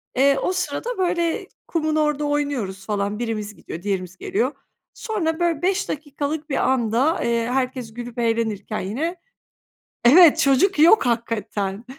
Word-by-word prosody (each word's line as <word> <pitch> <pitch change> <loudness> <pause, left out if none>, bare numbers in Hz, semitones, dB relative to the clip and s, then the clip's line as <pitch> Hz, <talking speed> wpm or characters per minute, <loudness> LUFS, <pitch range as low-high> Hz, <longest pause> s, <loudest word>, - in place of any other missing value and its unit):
Eee, 275 +1 +4
o 365 - 0
sırada 480 +6 -3
böyle 355 +1 0 0.2
kumun 315 -2 -1
orada 300 -1 +1
oynuyoruz 280 -10 -2
falan, 205 0 -2
birimiz 215 -3 -3
gidiyor, 165 - -8
diğerimiz 185 -2 -3
geliyor. 395 - -1 0.4
Sonra, 345 -8 -2
böyle, 340 -3 0
5 370 +1 0
dakikalık 295 +1 -4
bir 275 - -1 0.2
anda, 255 +6 +1
eee, 235 -1 0
herkes 255 -3 -2
gülüp 240 0 -7
eğlenirken 225 -3 -1
yine 275 - -3 0.9
Evet, 320 +5 +8
çocuk 300 +5 +3
yok 330 +1 +6
hakikaten. 215 -3 -2
270 Hz, 135 wpm, -22 LUFS, 225-320 Hz, 0.9 s, Evet